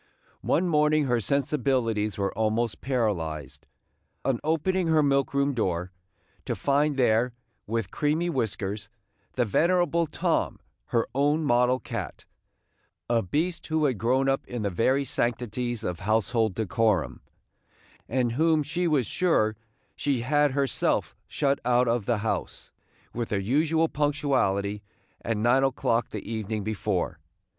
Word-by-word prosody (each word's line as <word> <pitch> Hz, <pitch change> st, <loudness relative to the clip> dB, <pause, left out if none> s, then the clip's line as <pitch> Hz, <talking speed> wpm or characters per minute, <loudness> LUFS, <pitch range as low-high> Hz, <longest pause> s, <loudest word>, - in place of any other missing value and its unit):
One 180 Hz, +3 st, +1 dB
morning 150 Hz, -1 st, +3 dB
her 125 Hz, -3 st, +1 dB
sensibilities 125 Hz, -5 st, 0 dB
were 100 Hz, -1 st, -1 dB
almost 110 Hz, +1 st, 0 dB
paralyzed, 90 Hz, -, -2 dB, 0.6 s
on 130 Hz, -4 st, +1 dB
opening 165 Hz, +4 st, +1 dB
her 160 Hz, -2 st, +4 dB
milk 140 Hz, -1 st, +2 dB
room 140 Hz, 0 st, +1 dB
door, 90 Hz, -6 st, -1 dB, 0.5 s
to -, -, -2 dB
find 145 Hz, +1 st, +1 dB
there, 120 Hz, -1 st, +2 dB, 0.3 s
with 115 Hz, +1 st, -2 dB
creamy 155 Hz, +4 st, 0 dB
whiskers, 105 Hz, -, -2 dB, 0.4 s
the 125 Hz, -, +1 dB
venerable 170 Hz, -, +2 dB
Tom, -, -, -1 dB, 0.3 s
her 115 Hz, -1 st, +1 dB
own 145 Hz, +4 st, +2 dB
model 125 Hz, -1 st, +3 dB
cat, -, -, -6 dB, 0.4 s
– -, -, -46 dB
a 115 Hz, -1 st, +3 dB
beast 165 Hz, -, -2 dB
who 160 Hz, -1 st, +1 dB
had 130 Hz, -8 st, 0 dB
grown 130 Hz, +5 st, +2 dB
up 135 Hz, 0 st, +1 dB
in 120 Hz, -3 st, -4 dB
the 100 Hz, -, -1 dB
very 130 Hz, +9 st, +1 dB
sanctities 120 Hz, -1 st, -2 dB
of 90 Hz, -4 st, -3 dB
household 110 Hz, 0 st, +1 dB
decorum, 110 Hz, -4 st, 0 dB, 0.9 s
and 125 Hz, -1 st, +1 dB
whom 155 Hz, +4 st, +2 dB
she 170 Hz, +5 st, -1 dB
was 145 Hz, -6 st, +2 dB
sure 110 Hz, -, +1 dB, 0.4 s
she 135 Hz, -4 st, 0 dB
had 145 Hz, +2 st, +2 dB
herself 140 Hz, -1 st, 0 dB
shut 140 Hz, -2 st, 0 dB
out 125 Hz, +1 st, +3 dB
of 115 Hz, -3 st, 0 dB
the 120 Hz, -, +2 dB
house, 110 Hz, -, -3 dB, 0.4 s
with 120 Hz, -1 st, -3 dB
her 100 Hz, -, 0 dB
usual 155 Hz, +10 st, +2 dB
punctuality, 135 Hz, -10 st, 0 dB, 0.4 s
at 115 Hz, -2 st, -1 dB
nine 120 Hz, +5 st, +3 dB
o'clock 120 Hz, -3 st, +1 dB
the 105 Hz, -, -7 dB
evening 110 Hz, -1 st, -3 dB
before. 105 Hz, -3 st, -2 dB
125 Hz, 135 wpm, -26 LUFS, 110-145 Hz, 0.9 s, her